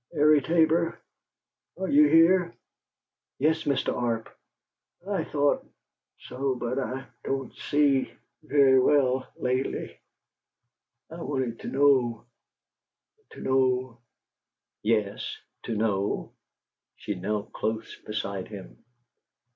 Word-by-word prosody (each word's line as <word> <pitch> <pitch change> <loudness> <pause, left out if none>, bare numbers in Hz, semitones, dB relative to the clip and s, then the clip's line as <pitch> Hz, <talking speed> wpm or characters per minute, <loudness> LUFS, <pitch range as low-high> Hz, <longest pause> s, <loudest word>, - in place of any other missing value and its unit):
Airie 150 0 +5
Tabor, 165 +2 +2 0.8
are 190 +1 -3
you 150 -1 +6
here?" 170 +3 +4 0.8
"Yes, 160 +3 +1
Mr. 140 -2 0
Arp." 115 -2 -2 0.7
"I 195 -5 -1
thought 145 -2 +1 0.6
so 135 0 -2
but 125 +2 -2
I 130 0 -3
I - - -15 0.2
don't 135 -1 -3
see 145 -2 +1 0.3
very 140 -3 +4
well 130 -1 +2
lately. 130 +1 -2 1.1
I 165 +1 -8
wanted 130 -6 -2
to - - -8
know 130 -5 +2 1.0
to - - -12
know 130 -2 +1 0.4
" - - -63
"Yes 105 -2 -2 0.3
to 115 - -2
know?" 105 -2 -1 0.6
She 105 - -4
knelt 100 +3 -4
close 110 0 -3
beside 100 -3 -4
him. - - -11
130 Hz, 105 wpm, -27 LUFS, 115-150 Hz, 1.1 s, you